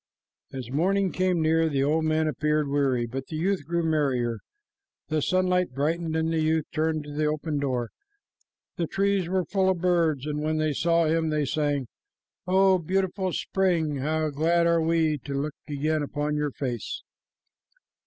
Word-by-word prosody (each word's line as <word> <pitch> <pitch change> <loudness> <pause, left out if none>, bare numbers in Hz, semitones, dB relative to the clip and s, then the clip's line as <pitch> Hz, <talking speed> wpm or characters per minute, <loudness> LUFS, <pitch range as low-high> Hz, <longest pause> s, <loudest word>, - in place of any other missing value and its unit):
As 125 -2 -7
morning 190 +6 +1
came 180 -3 +1
near, 160 +1 +3
the 135 -2 +1
old 155 +3 +1
man 155 0 +1
appeared 150 +1 0
weary, 135 -4 +1
but 130 +3 -6
the 160 - -6
youth 185 +4 0
grew 170 0 0
merrier. 130 -8 0 0.7
The 155 -1 0
sunlight 180 -3 +1
brightened, 160 +3 -1
and 160 0 0
the 160 - +1
youth 155 0 +1
turned 155 -1 0
to 145 - -9
the 150 +1 0
open 150 0 -2
door. 125 -4 -2 0.9
The 170 - -1
trees 195 -2 0
were 185 -1 0
full 190 -2 +1
of 185 -2 0
birds, 165 -6 +2
and 150 0 -2
when 155 +1 0
they 155 -1 +1
saw 170 +3 +2
him, 160 0 +1
they 150 -1 0
sang, 145 -2 -1 0.6
"O 190 0 +4
beautiful 190 +2 -1
spring! 170 -6 0
glad 155 +3 +1
are 170 -1 +3
we 160 -2 +1
to 140 +2 -6
look 150 +1 -3 0.2
again 155 +2 0
upon 145 +1 -2
your 150 0 0
face." 125 -3 -4
155 Hz, 165 wpm, -26 LUFS, 145-170 Hz, 0.9 s, O